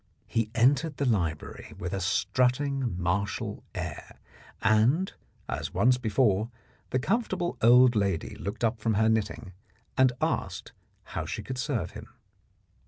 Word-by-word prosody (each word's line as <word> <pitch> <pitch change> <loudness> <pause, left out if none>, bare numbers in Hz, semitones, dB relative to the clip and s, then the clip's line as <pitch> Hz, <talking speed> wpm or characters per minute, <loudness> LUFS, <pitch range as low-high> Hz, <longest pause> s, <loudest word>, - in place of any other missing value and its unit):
He 115 -2 -1
entered 135 +5 +3
the 140 - 0
library 85 - -2
with 90 +2 -4
a 95 - -2
strutting 125 +2 +1
martial 95 +3 -2
air, - - -6 0.5
and, 115 - +3 0.3
as - - -4
once 125 +1 +4
before, 110 -2 +2 0.4
the - - +1
comfortable 185 - 0
old 125 +1 +7
lady 100 -5 0
looked 100 +5 -5
up 115 0 +1
from 110 0 0
her 110 +2 +3
knitting 110 -3 -1 0.4
and 130 -2 +5
asked - - -2 0.3
how - - -5
she - - -4
could 130 -1 -5
serve 125 - -1
him. - - -10
115 Hz, 135 wpm, -28 LUFS, 100-130 Hz, 0.5 s, old